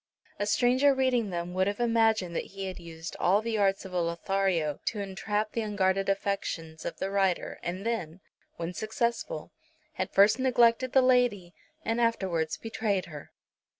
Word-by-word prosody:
A 205 Hz, -, -1 dB
stranger 260 Hz, +5 st, +4 dB
reading 255 Hz, -5 st, +1 dB
them 175 Hz, 0 st, -4 dB
would 185 Hz, +1 st, +1 dB
have 205 Hz, +2 st, -2 dB
imagined 225 Hz, -6 st, +2 dB
that -, -, -1 dB
he 195 Hz, -, -3 dB
had 185 Hz, -1 st, -6 dB
used 165 Hz, -1 st, -8 dB
all 195 Hz, +3 st, +4 dB
the 220 Hz, 0 st, -2 dB
arts 195 Hz, -1 st, +1 dB
of 190 Hz, -, -9 dB
a 180 Hz, -, +1 dB
Lothario 170 Hz, -2 st, 0 dB
to 215 Hz, -, -2 dB
entrap 205 Hz, +2 st, -2 dB
the 230 Hz, -, -2 dB
unguarded 195 Hz, -2 st, 0 dB
affections 180 Hz, -5 st, -2 dB
of 165 Hz, -, -4 dB
the 195 Hz, -, -3 dB
writer, 195 Hz, -3 st, 0 dB
and 185 Hz, +4 st, -4 dB
then, 190 Hz, -8 st, -2 dB, 0.4 s
when 170 Hz, +1 st, -4 dB
successful, 235 Hz, -, -2 dB, 0.5 s
had -, -, -1 dB
first 205 Hz, +5 st, +5 dB
neglected 250 Hz, -1 st, +3 dB
the 265 Hz, -, +6 dB
lady 245 Hz, -9 st, +2 dB, 0.3 s
and 230 Hz, +1 st, 0 dB
afterwards 190 Hz, -9 st, 0 dB
betrayed 215 Hz, -4 st, -1 dB
her. 150 Hz, -4 st, -10 dB
200 Hz, 165 wpm, -29 LUFS, 180-230 Hz, 0.5 s, the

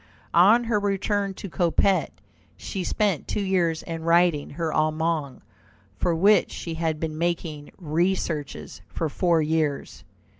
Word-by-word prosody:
On 210 Hz, +8 st, +6 dB
her 225 Hz, -3 st, +1 dB
return 200 Hz, 0 st, -1 dB
to 200 Hz, -, -7 dB
Coppet, 185 Hz, +2 st, +1 dB, 0.5 s
she 190 Hz, -3 st, -5 dB
spent 200 Hz, -4 st, 0 dB
two 205 Hz, -, -2 dB
years 175 Hz, -4 st, 0 dB
in 165 Hz, -1 st, -6 dB
writing 170 Hz, -2 st, +2 dB
her 160 Hz, +1 st, -3 dB
Allemagne, 155 Hz, -2 st, -1 dB, 0.5 s
for 175 Hz, -2 st, 0 dB
which 200 Hz, +6 st, +4 dB
she 165 Hz, -, -6 dB
had 160 Hz, -1 st, -2 dB
been 155 Hz, -1 st, -4 dB
making 165 Hz, -3 st, -3 dB
researches 165 Hz, -3 st, -2 dB
for 160 Hz, -, -3 dB
four 170 Hz, 0 st, +2 dB
years. 155 Hz, -2 st, -2 dB
170 Hz, 135 wpm, -25 LUFS, 160-190 Hz, 0.5 s, On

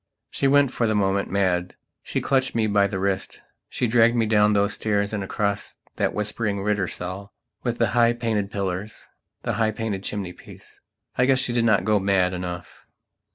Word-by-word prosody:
She 140 Hz, -, +1 dB
went, 140 Hz, -1 st, +4 dB
for 115 Hz, -, 0 dB
the 110 Hz, -, +1 dB
moment, 100 Hz, -1 st, +1 dB
mad. 90 Hz, -2 st, 0 dB, 0.3 s
She -, -, -3 dB
clutched 130 Hz, -1 st, +1 dB
me 115 Hz, -1 st, +2 dB
by 100 Hz, -1 st, +3 dB
the 95 Hz, -, -4 dB
wrist; 95 Hz, 0 st, -2 dB, 0.3 s
she -, -, -1 dB
dragged 115 Hz, 0 st, +4 dB
me 115 Hz, -1 st, +2 dB
down 105 Hz, -1 st, +4 dB
those 100 Hz, 0 st, +2 dB
stairs 100 Hz, -1 st, -1 dB
and 100 Hz, -2 st, -2 dB
across 100 Hz, +1 st, -2 dB, 0.2 s
that -, -, +1 dB
whispering 105 Hz, -1 st, -2 dB
Rittersaal 100 Hz, -1 st, -3 dB, 0.3 s
with -, -, -2 dB
the -, -, +2 dB
high 120 Hz, 0 st, +4 dB
painted 110 Hz, -4 st, -1 dB
pillars, 100 Hz, +1 st, -4 dB, 0.3 s
the -, -, -1 dB
high 110 Hz, -, +3 dB
painted 110 Hz, -3 st, -3 dB
chimney 100 Hz, -3 st, -4 dB
piece. -, -, -15 dB, 0.4 s
I 125 Hz, -, +4 dB
guess 135 Hz, -1 st, +4 dB
she 130 Hz, -2 st, 0 dB
did 120 Hz, -1 st, +2 dB
not 100 Hz, -5 st, +3 dB
go 105 Hz, 0 st, +3 dB
mad 95 Hz, -2 st, +2 dB
enough. 90 Hz, -1 st, -7 dB
105 Hz, 185 wpm, -24 LUFS, 95-115 Hz, 0.4 s, went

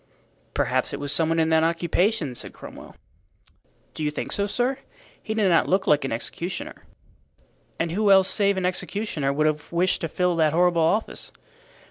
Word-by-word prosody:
"Perhaps -, -, 0 dB
it -, -, -4 dB
was 145 Hz, -1 st, -4 dB
some 160 Hz, +1 st, +1 dB
one 165 Hz, -, +1 dB
in 160 Hz, 0 st, +2 dB
that 160 Hz, 0 st, +4 dB
occupation," 170 Hz, -, 0 dB
said -, -, -8 dB
Cromwell. -, -, -12 dB, 1.0 s
"Do 155 Hz, -, -5 dB
you 150 Hz, -, +1 dB
think 150 Hz, -, -5 dB
so, 200 Hz, 0 st, +1 dB
sir? 250 Hz, +5 st, -1 dB, 0.4 s
He 220 Hz, -, -4 dB
did 215 Hz, -3 st, +2 dB
not 170 Hz, -3 st, +3 dB
look 190 Hz, +1 st, +2 dB
like 150 Hz, -1 st, +3 dB
an 135 Hz, -, -3 dB
executioner." 180 Hz, -, -4 dB, 1.0 s
"And 165 Hz, 0 st, -1 dB
who 205 Hz, +4 st, +1 dB
else 190 Hz, -1 st, +6 dB
save 200 Hz, -2 st, +2 dB
an 185 Hz, -, -1 dB
executioner 180 Hz, -5 st, -2 dB
would 150 Hz, +2 st, 0 dB
have 150 Hz, -1 st, -1 dB
wished 175 Hz, +2 st, +1 dB
to 165 Hz, -, -1 dB
fill 180 Hz, +2 st, 0 dB
that 155 Hz, -2 st, +3 dB
horrible 175 Hz, 0 st, +3 dB
office?" 195 Hz, +8 st, -1 dB
170 Hz, 180 wpm, -24 LUFS, 155-200 Hz, 1.0 s, else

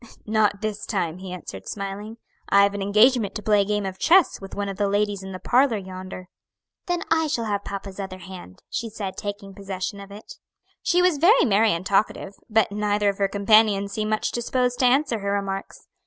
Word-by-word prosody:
"Not 210 Hz, -2 st, +1 dB
this 215 Hz, -1 st, -4 dB
time," 180 Hz, -4 st, -2 dB
he 190 Hz, -1 st, -8 dB
answered, 100 Hz, -, -8 dB
smiling. 205 Hz, +2 st, -6 dB, 0.3 s
"I 200 Hz, 0 st, +6 dB
have 200 Hz, 0 st, +2 dB
an 200 Hz, -, -4 dB
engagement 215 Hz, +2 st, +3 dB
to 210 Hz, -, -5 dB
play 210 Hz, -1 st, +4 dB
a -, -, 0 dB
game 210 Hz, 0 st, -1 dB
of 190 Hz, -1 st, -5 dB
chess 355 Hz, -, +4 dB
with 195 Hz, -, -9 dB
one 205 Hz, 0 st, -2 dB
of 195 Hz, -1 st, -5 dB
the 205 Hz, -, +1 dB
ladies 205 Hz, -1 st, 0 dB
in 190 Hz, 0 st, -8 dB
the 185 Hz, -, -5 dB
parlor 250 Hz, +3 st, +2 dB
yonder." 185 Hz, -1 st, -8 dB, 0.6 s
"Then 350 Hz, -1 st, -1 dB
I 320 Hz, -1 st, +3 dB
shall 235 Hz, -6 st, -1 dB
have 205 Hz, -2 st, -2 dB
papa's 195 Hz, 0 st, -7 dB
other 190 Hz, -1 st, -5 dB
hand," 180 Hz, -, -11 dB
she 230 Hz, -, -4 dB
said, 200 Hz, -3 st, -5 dB
taking 205 Hz, -1 st, -6 dB
possession 195 Hz, 0 st, -5 dB
of 200 Hz, 0 st, -10 dB
it. 205 Hz, +2 st, -12 dB, 0.4 s
She 355 Hz, +1 st, +2 dB
was 355 Hz, -5 st, +3 dB
very 385 Hz, -, +5 dB
merry 215 Hz, -1 st, +3 dB
and 170 Hz, +2 st, -2 dB
talkative, 200 Hz, 0 st, 0 dB, 0.2 s
but 220 Hz, -1 st, +2 dB
neither 205 Hz, 0 st, +1 dB
of 200 Hz, -, -4 dB
her 200 Hz, -, +3 dB
companions 200 Hz, 0 st, +3 dB
seemed 215 Hz, -1 st, -2 dB
much 215 Hz, 0 st, 0 dB
disposed 245 Hz, +1 st, -1 dB
to 255 Hz, -, +3 dB
answer 250 Hz, -2 st, +2 dB
her 200 Hz, 0 st, -2 dB
remarks. 195 Hz, -1 st, -4 dB
205 Hz, 210 wpm, -24 LUFS, 195-220 Hz, 0.6 s, I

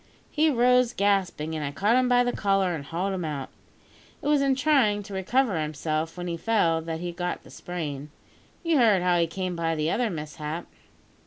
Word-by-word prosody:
He 315 Hz, +1 st, +3 dB
rose 250 Hz, -2 st, +3 dB
gasping, 190 Hz, -6 st, 0 dB
and 155 Hz, -, -3 dB
I 140 Hz, -, -2 dB
caught 205 Hz, +9 st, +2 dB
him 255 Hz, 0 st, +3 dB
by 245 Hz, 0 st, +5 dB
the 245 Hz, -, 0 dB
collar 195 Hz, -3 st, +1 dB
and 155 Hz, -4 st, -4 dB
hauled 180 Hz, +6 st, -2 dB
him 185 Hz, -2 st, -3 dB
out. 145 Hz, -4 st, -4 dB, 0.7 s
It -, -, -2 dB
was 295 Hz, -1 st, +3 dB
in 275 Hz, -1 st, +2 dB
trying 255 Hz, -8 st, +2 dB
to 200 Hz, 0 st, -10 dB
recover 195 Hz, -1 st, +1 dB
himself 155 Hz, +2 st, -3 dB
when 175 Hz, -, -4 dB
he 170 Hz, -1 st, -3 dB
fell 165 Hz, -6 st, +1 dB
that 165 Hz, 0 st, -5 dB
he 175 Hz, 0 st, -3 dB
got 175 Hz, +1 st, -4 dB
the -, -, -15 dB
sprain. 150 Hz, -5 st, -5 dB, 0.5 s
You've 330 Hz, -4 st, +2 dB
heard 210 Hz, -7 st, +4 dB
how 180 Hz, -1 st, +3 dB
he 170 Hz, -, +2 dB
came 185 Hz, +1 st, -4 dB
by 165 Hz, -1 st, -1 dB
the 155 Hz, +1 st, 0 dB
other 240 Hz, 0 st, +1 dB
mishap?" 155 Hz, 0 st, -5 dB
180 Hz, 200 wpm, -26 LUFS, 160-230 Hz, 0.7 s, by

